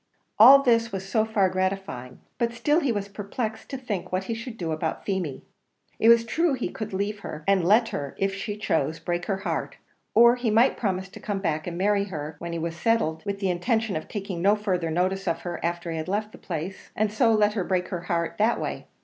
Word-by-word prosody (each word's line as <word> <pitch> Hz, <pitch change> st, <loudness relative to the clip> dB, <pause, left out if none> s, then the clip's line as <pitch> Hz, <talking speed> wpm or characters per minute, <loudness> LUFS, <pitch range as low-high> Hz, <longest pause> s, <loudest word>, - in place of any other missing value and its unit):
All 270 Hz, +5 st, +10 dB
this 230 Hz, -2 st, +3 dB
was 195 Hz, 0 st, -5 dB
so 220 Hz, +2 st, +2 dB
far 215 Hz, -3 st, +2 dB
gratifying, 185 Hz, -9 st, -3 dB, 0.2 s
but 235 Hz, 0 st, 0 dB
still 295 Hz, +7 st, +2 dB
he 280 Hz, -7 st, 0 dB
was 205 Hz, -3 st, -2 dB
perplexed 215 Hz, +2 st, -5 dB
to 270 Hz, -, -4 dB
think 220 Hz, -8 st, -4 dB
what 185 Hz, +1 st, 0 dB
he 230 Hz, -, -3 dB
should 230 Hz, +1 st, -7 dB
do 165 Hz, -5 st, -3 dB
about 155 Hz, +1 st, -3 dB
Feemy. 185 Hz, -8 st, -2 dB, 0.6 s
It 225 Hz, -, +5 dB
was 230 Hz, 0 st, +6 dB
true 320 Hz, +7 st, +1 dB
he 255 Hz, -, -2 dB
could 215 Hz, -1 st, -6 dB
leave 200 Hz, +2 st, -2 dB
her, 155 Hz, -5 st, -7 dB
and 195 Hz, -2 st, +3 dB
let 220 Hz, +6 st, +4 dB
her, 140 Hz, -1 st, -5 dB
if 195 Hz, 0 st, 0 dB
she 205 Hz, +2 st, -4 dB
chose, 160 Hz, -6 st, 0 dB
break 175 Hz, 0 st, -3 dB
her 195 Hz, -, 0 dB
heart; 165 Hz, -3 st, -2 dB, 0.4 s
or 235 Hz, +2 st, +7 dB
he 245 Hz, -2 st, 0 dB
might 230 Hz, +5 st, +4 dB
promise 190 Hz, -3 st, -2 dB
to -, -, -11 dB
come 205 Hz, -2 st, -3 dB
back 165 Hz, -5 st, -2 dB
and 170 Hz, -1 st, -4 dB
marry 200 Hz, +1 st, +2 dB
her, 155 Hz, -5 st, -6 dB
when 170 Hz, 0 st, -5 dB
he 170 Hz, -, -3 dB
was 165 Hz, 0 st, -3 dB
settled, 170 Hz, -6 st, 0 dB
with 200 Hz, 0 st, -1 dB
the 195 Hz, -2 st, 0 dB
intention 220 Hz, +4 st, 0 dB
of 155 Hz, -, -4 dB
taking 195 Hz, -4 st, -5 dB
no 200 Hz, +3 st, +5 dB
further 185 Hz, -5 st, -1 dB
notice 185 Hz, +4 st, 0 dB
of 165 Hz, -1 st, 0 dB
her 175 Hz, -2 st, -5 dB
after 170 Hz, 0 st, -2 dB
he 165 Hz, -, -3 dB
had 160 Hz, -, -4 dB
left 210 Hz, +3 st, -2 dB
the -, -, -13 dB
place; 175 Hz, +2 st, -6 dB
and 210 Hz, 0 st, 0 dB
so 230 Hz, 0 st, +4 dB
let 210 Hz, -1 st, +3 dB
her 205 Hz, -4 st, -1 dB
break 180 Hz, -1 st, -1 dB
her 180 Hz, -3 st, -3 dB
heart 170 Hz, +1 st, -1 dB
that 225 Hz, +3 st, +3 dB
way. -, -, -4 dB
195 Hz, 235 wpm, -26 LUFS, 175-220 Hz, 0.6 s, All